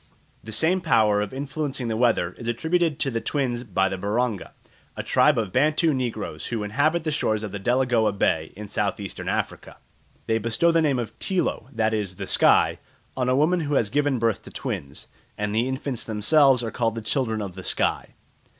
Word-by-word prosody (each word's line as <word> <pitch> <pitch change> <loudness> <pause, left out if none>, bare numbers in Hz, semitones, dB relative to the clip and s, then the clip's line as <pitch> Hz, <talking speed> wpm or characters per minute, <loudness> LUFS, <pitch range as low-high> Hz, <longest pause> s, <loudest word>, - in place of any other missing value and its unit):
The 110 - -8
same 165 - +2
power 105 -7 +3
of 105 - -3
influencing 140 -1 -4
the 110 - -1
weather 115 -7 +2
is 115 - -6
attributed 160 +6 0
to 115 -4 0
twins 125 -4 -1
by 95 -4 +1
the 95 0 -4
Baronga, 105 +1 -1 0.4
a - - -3
tribe - - +3
of 105 -5 -2
Bantu 155 +4 +3
negroes 120 -5 -3
who, 115 -3 -3
inhabit 145 +10 +1
the 155 - -1
shores 110 -7 0
of 105 - -5
Delagoa 120 +1 +1
Bay 80 -5 0
in 105 +2 -8
South - - -1
eastern - - -5
Africa. - - -3 0.5
They 110 0 +1
bestow 115 +10 +2
the 165 0 +3
name 145 -4 +2
of 120 -3 -4
Tilo 185 -8 -1
that 110 -2 0
is, 100 -4 -2
the - - -5
sky - - +4 0.4
on 125 -1 0
a 130 - +3
woman 160 +6 +3
who 145 -3 -1
has 110 -6 +1
given 145 -1 +1
birth 115 -2 0
to - - -12
twins, 70 +1 -6 0.3
and 105 0 -2
the 115 +3 +1
infants 130 -2 -3
themselves 125 +4 +3
are 115 - -3
called 115 -2 -1
the 115 - -4
children 110 -3 -1
of 100 -3 -5
the 95 - -8
sky. - - -1
120 Hz, 195 wpm, -24 LUFS, 105-140 Hz, 0.5 s, sky